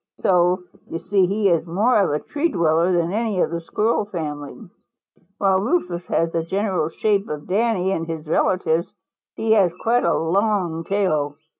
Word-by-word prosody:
So 180 0 +2 0.3
you - - -3
see 190 +1 +1
he 200 +2 +1
is 170 -1 +1
more 210 +8 +2
of 195 - +1
a 145 - +1
tree 300 - -2
dweller 170 - +2
than 175 0 0
any 220 -3 -1
of - - +1
the 170 0 -3
Squirrel 215 +5 0
family. 150 -7 -6 0.8
While 195 -2 +2
Rufous 190 - -1
has 165 0 0
the 165 - 0
general 185 -2 -1
shape 200 +3 0
of 150 -1 -5
Danny 195 -1 +1
and 165 -3 -2
his 160 -1 -6
relatives, 165 0 +1 0.4
he 225 - -1
has 200 -5 +4
quite 240 +2 +2
a 170 - +2
long 175 -1 0
tail. 155 -8 0
180 Hz, 170 wpm, -22 LUFS, 165-205 Hz, 0.8 s, has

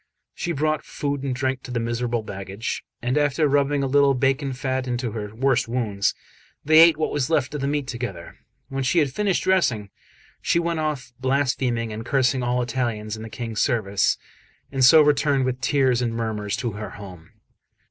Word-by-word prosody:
She 175 - -3
brought 155 0 0
food 145 -1 -3
and 135 -2 -2
drink 130 0 -1
to - - -11
the 125 -1 -1
miserable 120 0 -1
baggage; 100 +2 -5 0.2
and 125 +4 +1
after 145 +1 +2
rubbing 140 0 +2
a - - +1
little 140 0 +4
bacon 135 +2 +1
fat 130 0 -2
into 120 -1 -2
her 105 -1 -5
worst 130 -1 +1
wounds, 110 -5 0 0.5
they 155 +1 +6
ate 165 -2 +7
what 155 - -1
was 145 -1 -1
left 150 -4 +1
of 150 - -3
the 140 - 0
meat 145 -1 -1
together. 120 -9 -6 0.3
When 135 0 -3
she 130 +6 +1
had 145 -5 +2
finished 205 -3 0
dressing, 125 - +1 0.5
she - - +1
went 170 -1 0
off 145 -6 -3
blaspheming 130 -4 0
and 110 +1 -5
cursing 130 0 +1
all 125 0 0
Italians 115 -4 -2
in 110 - -9
the 110 - -7
King's 115 -2 -4
service, 100 -5 +1 0.5
and 135 -1 0
so 155 +5 +8
returned 145 -2 +2
with 130 0 -2
tears 130 -1 +2
and 115 -2 -1
murmurs 105 -2 -2
to 115 +2 -2
her 105 0 -6
home. 90 -4 -11
130 Hz, 190 wpm, -23 LUFS, 115-140 Hz, 0.5 s, so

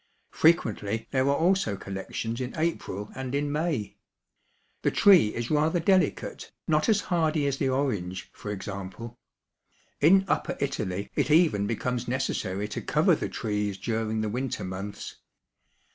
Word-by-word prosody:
Frequently 115 -9 +2
there 130 -1 +2
are 140 - +3
also 165 - +2
collections 100 +5 -4
in 125 +5 -5
April 130 - -2
and 130 0 -4
in 145 0 0
May. 150 -8 -2 0.8
The - - +2
tree 190 - +6
is 120 +3 -3
rather 155 +3 +2
delicate, 185 -1 +1 0.2
not 155 +3 +2
as 210 -2 +4
hardy 160 -5 +1
as 140 -1 0
the 135 - +1
orange, 100 -9 -2
for 105 - -8
example. 100 +4 -6 0.8
In 190 +6 +5
upper - - -1
Italy 105 -9 -2
it - - 0
even 150 - +4
becomes 120 +2 -2
necessary 105 -6 -2
to - - -4
cover - - +3
the - - -1
trees 105 -2 -2
during 110 +1 -2
the 110 - -1
winter 125 +3 -3
months. 95 +2 -6
125 Hz, 145 wpm, -27 LUFS, 105-155 Hz, 0.8 s, tree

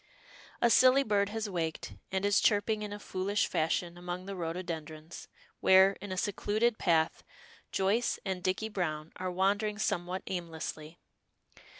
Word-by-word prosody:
A 235 - +5
silly 260 +3 +6
bird 205 -3 +1
has 220 0 -3
waked, 165 -5 -3 0.2
and 190 +1 0
is 205 -1 +4
chirping 210 +1 +2
in 210 -1 -5
a 205 - -5
foolish 200 0 -1
fashion 170 +2 -1
among 180 +1 -5
the 195 0 -5
rhododendrons, 165 -2 -6 0.3
where, 190 +1 +6
in 200 -1 -7
a 185 - -3
secluded 215 +4 0
path, 160 -2 +2 0.5
Joyce 205 +5 +1
and 190 -2 -2
Dicky 185 +4 -1
Browne 160 -6 -3
are 185 0 -3
wandering 200 +3 +1
somewhat 185 -3 -2
aimlessly. 165 -2 -5
190 Hz, 140 wpm, -31 LUFS, 175-205 Hz, 0.5 s, silly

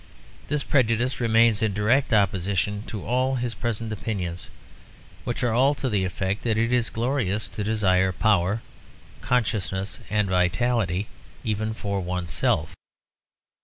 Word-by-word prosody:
This 145 0 0
prejudice 125 -1 +1
remains 115 -2 +4
in 110 -3 0
direct 115 +7 +2
opposition 100 0 +1
to 105 -4 -6
all 130 +3 +1
his 120 -2 -2
present 115 -2 -3
opinions, 90 -5 -4 0.8
which 120 +2 -2
are 120 -2 +2
all 135 +5 +4
to 135 - -2
the 100 -4 +1
effect 95 +2 -2
that 115 -2 0
it 115 +2 +1
is 120 -2 +2
glorious 115 -4 -1
to 105 - -4
desire 95 -3 +2
power, 100 +1 +1 0.6
consciousness, 105 -6 -1
and 105 -1 +1
vitality 95 +1 +1 0.4
even 110 0 -1
for 100 -2 -2
one's 90 -2 -3
self. - - 0
110 Hz, 135 wpm, -25 LUFS, 95-120 Hz, 0.8 s, remains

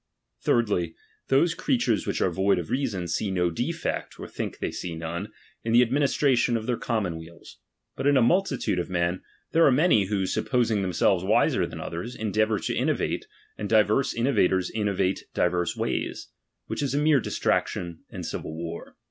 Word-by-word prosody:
Thirdly, 100 -8 +1 0.3
those 165 +6 +3
creatures 165 - 0
which - - -1
are 95 - +2
void 95 +3 +2
of 85 -3 -4
rea 135 +1 +1
son, 95 -6 -4
see 100 +5 -1
no 90 -2 +1
defect, 80 - -3
or - - -6
think - - -5
they - - -3
see 85 -2 -5
none, 85 +5 -5 0.3
in 115 - -1
the 120 +1 +7
administration 130 -1 +2
of 110 - -5
their 125 - 0
commonweals; 85 -8 -4 0.4
but - - -1
iu 145 -1 +5
a - - +5
multitude 140 - +1
of 90 - -3
men 85 0 0 0.3
there 165 0 +4
are 140 - +6
many 130 - +4
who, 100 -1 -1
supposing 115 0 +1
themseh'es 90 -3 +2
wiser - - +2
than - - -8
others, 90 +9 -5
endeavour 110 0 +1
to - - -2
innovate, - - -1 0.3
and 105 - -3
divers 110 +4 +3
in 115 - -3
novators 95 -8 +2
innovate 100 -3 0
divers 90 -1 +1
ways; - - -3 0.4
which - - -4
is 140 -1 -1
a - - +2
mere 150 -1 +4
distraction 85 -6 -1
and - - -7
civil 80 - -5
war. 85 0 -7
105 Hz, 175 wpm, -26 LUFS, 90-125 Hz, 0.4 s, the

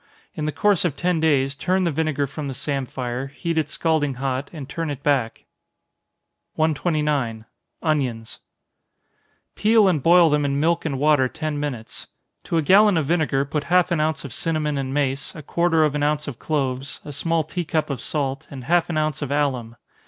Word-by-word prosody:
In 150 - -4
the 155 - 0
course 205 +2 +2
of 170 -6 0
ten 175 +1 0
days, 140 -4 +2
turn 185 +6 0
the 170 - +1
vinegar 150 -2 0
from 145 +1 -6
the 135 - -5
samphire, 130 -2 -3
heat 165 +4 -4
it 150 -2 -2
scalding 155 -4 0
hot, 135 +1 -2
and 150 -6 -8
turn 165 +2 -4
it 140 -1 -6
back. 135 -6 0 1.1
129. 150 -7 0 0.4
Onions. 130 -8 -1 1.1
Peel 215 -1 +4
and 165 -6 +2
boil 170 +1 +6
them 150 0 +2
in 140 0 0
milk 165 +2 +1
and 140 -4 -1
water 145 -2 +3
ten 155 +1 -4
minutes. 125 -7 -5 0.4
To 165 - -1
a 160 - +2
gallon 200 +4 +5
of 155 - +1
vinegar 140 -4 +1
put 145 +1 -3
half 180 0 +3
an 170 - +1
ounce 155 -1 -1
of 135 - -6
cinnamon 155 -2 -1
and 130 -1 -3
mace, 135 -1 -1
a 155 - -8
quarter 170 +1 +2
of 150 -2 +2
an 150 - -1
ounce 150 +1 0
of 130 -5 -6
cloves, 135 -3 -2
a 145 - -7
small 165 +3 0
tea 175 +4 -4
cup 155 -2 -1
of 130 -4 -4
salt, 140 -3 -2
and 135 -3 -8
half 170 +6 +2
an 165 - -1
ounce 155 -1 -1
of 145 - -3
alum. 130 -6 -1
150 Hz, 190 wpm, -23 LUFS, 135-160 Hz, 1.1 s, boil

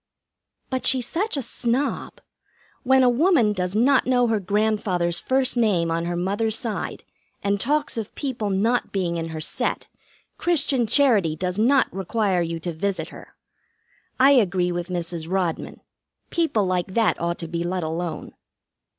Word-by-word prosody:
"But 260 -1 -1
she's 260 -2 +2
such 375 +4 -2
a 275 - -2
snob. 240 +4 -2 0.6
When 265 0 +4
a - - +5
woman 245 - +3
does 180 0 -3
not 260 +5 +3
know 250 -1 +3
her 225 -2 +1
grandfather's 200 -3 0
first 260 -1 +1
name 195 -8 +2
on 165 +1 -1
her 175 0 -2
mother's 205 +5 0
side 225 -4 -4 0.4
and 200 0 0
talks 290 -2 0
of 215 - -7
people 245 -7 -3
not 220 +6 0
being 175 -3 -1
in 165 0 -3
her 160 -1 -6
set, 155 - -2 0.5
Christian 275 -8 +1
charity 215 - +3
does 180 +3 -3
not 260 +5 +4
require 195 0 0
you 165 -1 -3
to 175 0 -3
visit 170 -1 -2
her. - - -13 0.8
I 270 +2 +7
agree 185 -8 +3
with 175 0 -3
Mrs. 170 -2 -4
Rodman. 185 -3 -2 0.5
People 320 - +1
like 185 0 -2
that 225 -6 +2
ought 170 0 -1
to 165 - -6
be 170 +1 -3
let 180 0 -2
alone." 160 0 -4
205 Hz, 160 wpm, -23 LUFS, 175-245 Hz, 0.8 s, I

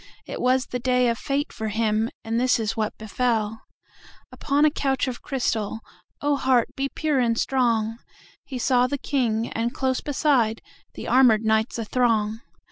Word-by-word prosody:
It - - -6
was 255 +1 +2
the 250 - -4
day 250 0 +2
of 230 - -2
fate 285 +1 -2
for 220 -2 -4
him, 220 +1 0
And 225 +1 -1
this 250 -1 +2
is 215 -2 -2
what 215 -1 -2
befell:Upon 225 +5 -3
a 305 - +4
couch 270 -2 0
of 250 -2 -5
crystal(Oh, 225 +1 -3
heart 255 -3 +2
be 275 0 -1
pure 300 -3 0
and 230 -2 +1
strong!)He 235 +1 -2
saw 250 0 +3
the 285 - -2
King, 235 -5 -1
and, 230 +1 -2
close 260 -1 0
beside, 260 -6 +1 0.3
The - - -7
armored 245 -4 +5
knights 220 +2 +1
athrong. 225 -2 0
240 Hz, 150 wpm, -24 LUFS, 220-265 Hz, 0.3 s, armored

